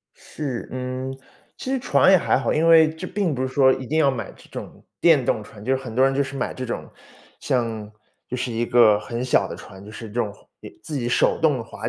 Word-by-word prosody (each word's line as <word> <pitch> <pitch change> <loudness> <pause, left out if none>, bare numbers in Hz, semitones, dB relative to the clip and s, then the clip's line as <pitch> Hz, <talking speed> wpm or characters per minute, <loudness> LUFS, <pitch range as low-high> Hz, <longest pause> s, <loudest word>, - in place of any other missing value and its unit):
是。 135 -6 -6
嗯， 130 +1 -4 0.4
其 260 - -6
实 270 - +1
船 240 -6 +4
也 190 - +8
还 165 - +2
好， 125 - 0
因 160 +2 +2
为 160 -1 +7
这 160 +3 -7
并 185 -6 -1
不 130 - -2
是 130 - -1
说 130 -1 +4
一 130 0 -4
定 155 +5 0
要 140 -3 +4
买 110 -6 -5
这 - - -18
种 - - -9 0.2
电 155 -7 +5
动 110 - 0
船， 105 0 -13
就 130 +1 +2
很 125 -4 -8
多 130 +2 +4
人 135 - +2
就 140 - +2
是 140 0 -6
买 - - -3
这 130 - -5
种， 120 - -5 0.5
像 115 -4 -2 0.4
就 125 - -3
是 125 -1 -3
一 115 +1 0
个 110 -4 +5
很 120 +2 -4
小 130 - +2
的 - - -6
船， 95 +1 -12
就 105 - -10
是 110 +1 -8
这 105 - -13
种 115 -4 -1
划 - - -22 0.4
自 150 - -5
己 120 -2 -2
手 - - +2
动 145 -7 +2
划 115 - -6
130 Hz, 265 characters per minute, -23 LUFS, 115-145 Hz, 0.5 s, 也